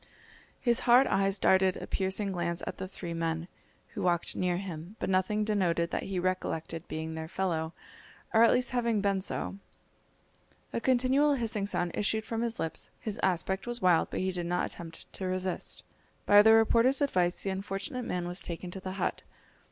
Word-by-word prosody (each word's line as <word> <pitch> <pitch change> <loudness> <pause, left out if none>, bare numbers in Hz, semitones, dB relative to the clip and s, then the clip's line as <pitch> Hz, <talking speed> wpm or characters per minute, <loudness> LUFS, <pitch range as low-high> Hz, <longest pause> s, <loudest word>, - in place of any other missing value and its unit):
His 240 -2 +2
hard 250 +3 +8
eyes 195 -2 +2
darted 190 -1 +3
a - - -6
piercing 195 +1 -1
glance 170 -2 -2
at - - -5
the 190 - -4
three 175 -2 -6
men, 165 0 -2 0.4
who - - -6
walked 175 -1 0
near 180 -1 0
him, 180 0 -7
but - - -2
nothing 190 +3 +1
denoted 180 -5 +1
that - - -2
he 190 - -2
recollected 175 -3 -2
being 160 +1 -4
their 160 0 -5
fellow, 165 -3 -2 0.6
or 220 - +5
at 230 - +7
least 250 +1 +2
having 235 -3 +1
been 195 -1 +1
so. 195 +1 -3 1.1
A 230 - -1
continual 260 +4 +3
hissing 220 -5 -1
sound 175 -3 -1
issued 220 +1 0
from 225 0 -3
his 235 -1 -2
lips, 160 -1 -3
his 215 -3 -4
aspect 190 +3 0
was 240 0 -2
wild, 180 -5 +3
but - - -3
he 190 0 0
did 175 -2 -3
not 175 +1 0
attempt 165 -1 -9
to 190 - -4
resist. 185 0 -2 0.4
By 205 0 +8
the 220 +1 +7
reporter's 230 +4 +5
advice 185 -11 +1
the 195 - -1
unfortunate 195 +5 -4
man 175 -1 -2
was 175 +2 0
taken 175 +1 -5
to 190 - -6
the 185 0 -5
hut. 195 - -2
190 Hz, 185 wpm, -30 LUFS, 175-220 Hz, 1.1 s, hard